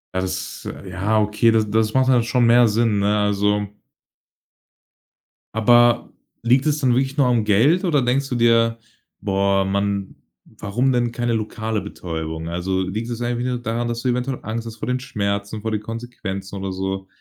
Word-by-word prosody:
Ja, 95 - +1
das 95 0 -4 0.3
ja 100 +4 0
okay, 105 +2 +3
da 115 - +4
das 110 +1 0
macht 130 0 +3
dann 125 -3 +4
schon 120 +1 +2
mehr 120 0 +6
Sinn, 110 -1 +1
ne, 105 +1 +2
also 105 0 +1 1.9
Aber 120 +1 +4 0.3
liegt 125 +4 +3
es 150 -1 +1
dann 130 -4 +2
wirklich 135 +2 0
nur 140 -3 +3
am 120 -3 +2
Geld 140 - +3
oder 150 -6 +2
denkst 130 +3 +1
du 125 - -3
dir: 115 -1 +3 0.4
„Boah, 100 -1 +1
mann, 100 0 -2 0.4
warum 120 +6 0
denn 120 -2 0
keine 120 0 -1
lokale 110 0 -2
Betäubung?“ 80 -1 -5
Also, 95 +2 -1
liegt 105 +6 -3
das 120 0 -4
eigentlich 120 +1 -1
nur 125 -1 -1
daran, 120 +1 -2
dass 115 0 -3
du 130 - 0
eventuell 125 +1 -1
Angst 115 +1 -4
hast 115 - -7
vor - - -5
den 125 0 0
Schmerzen, 100 -4 -3
vor 110 - -3
den 105 - 0
Konsequenzen 105 -4 -6
oder 95 -1 -4
so? 95 0 -4
110 Hz, 180 wpm, -21 LUFS, 100-120 Hz, 1.9 s, mehr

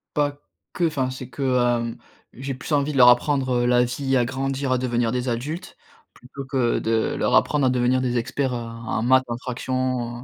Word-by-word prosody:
Pas 145 -1 0 0.3
que, 175 - -1
enfin, 145 -6 0
c'est 130 -1 -7
que, 130 +3 -7
hem, 120 -3 +1 0.4
j'ai 135 +1 -5
plus 130 - -7
envie 145 0 +1
de - - -5
leur 125 -2 +8
apprendre, 130 +2 +3
heu, - - +1
la 125 0 +4
vie, 135 +2 -1
à 125 - +3
grandir, 135 +1 -2
à 130 - +2
devenir 120 -2 0
des 125 0 -2
adultes 140 +9 -4 0.4
plutôt 135 +2 -10
que 130 -3 0
de 110 0 0
leur - - 0
apprendre 145 -3 +2
à - - +3
devenir 125 +1 +2
des 125 -1 0
experts, 130 +2 -2
heu, - - -2
en 115 -1 -4
maths, 130 +2 +4
en 120 - -3
fraction, 125 -1 -3
130 Hz, 205 wpm, -23 LUFS, 120-135 Hz, 0.4 s, leur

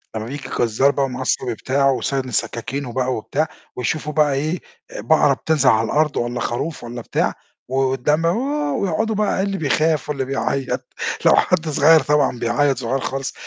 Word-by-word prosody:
لما 110 0 -3
بييجي 140 +2 -6
الجزار 120 +4 +2
بقى 140 0 0
ومعاه 130 0 -5
الصَبي 125 -2 0
بتاعه، 135 +4 +1
وسانن 130 -1 -2
سكاكينه 120 +3 -3
بقى 130 0 0
وبتاع، 125 +8 -1 0.3
ويشوفوا 150 +4 -2
بقى 150 -1 +3
إيه 155 +6 -1 0.3
آآ - - -6
بقرة 155 -3 +4
بتنزل 140 -1 +2
على 110 -1 +3
الأرض 150 +4 +1
والّا 120 +1 -2
خروف 135 +6 -3
والّا 120 0 -6
بتاع، - - -1 0.4
و 130 - -3
والدم 135 +4 +1
ووه، 250 - 0
ويقعدوا 200 +7 0
بقى 205 -2 +1
اللي 195 0 -2
بيخاف 155 -1 +1
واللي 140 -3 -1
بيعيّط، 135 0 -2 0.3
لو - - +7
حد 165 -3 +2
صغير 155 +2 +6
طبعًا 145 -4 +1
بيعيّط- 135 +4 +1
صغير 130 +2 -1
خالص- 135 +1 -3
140 Hz, 175 wpm, -20 LUFS, 130-155 Hz, 0.4 s, لو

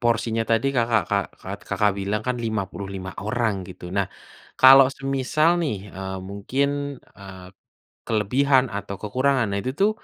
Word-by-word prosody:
porsinya 115 -1 +1
tadi 115 +3 +2
Kakak 115 -2 +2
Kak 100 -2 +1
Kak - - -6
Kakak 105 -1 +2
bilang 100 +2 -1
kan 125 0 0
55 100 -4 -4
orang 110 -4 -1
gitu. 90 -1 -9
Nah, 100 -1 +2 0.5
kalau 135 +1 +9
semisal 135 +3 +1
nih, 105 - -3
eee, 95 0 -5
mungkin, 115 +8 -1 0.5
eee, 95 -2 -11 0.6
kelebihan 130 +5 +3
atau 100 -1 -5
kekurangan, 130 +3 +1
nah 100 - -1
itu 130 - -1
tuh 205 +2 +5
110 Hz, 145 wpm, -23 LUFS, 100-130 Hz, 0.6 s, kalau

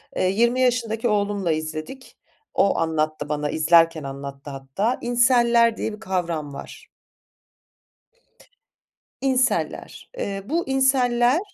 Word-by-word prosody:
Eee, 185 - +1
20 235 +5 +2
yaşındaki 235 -2 0
oğlumla 205 -4 0
izledik. 155 - -6 0.4
O, 200 - +2
anlattı 155 -2 -1
bana 150 -1 -2
izlerken 165 0 +3
anlattı 140 +1 -8
hatta. 135 - -2
Incel'ler 240 -1 +3
diye 220 - -3
bir 210 - -10
kavram 170 -7 -3
var. - - -10 2.4
Incel'ler, 260 -1 -1
eee, 195 -1 -3
bu 335 +3 0
incel'ler 260 0 +2
205 Hz, 105 wpm, -23 LUFS, 155-240 Hz, 2.4 s, izlerken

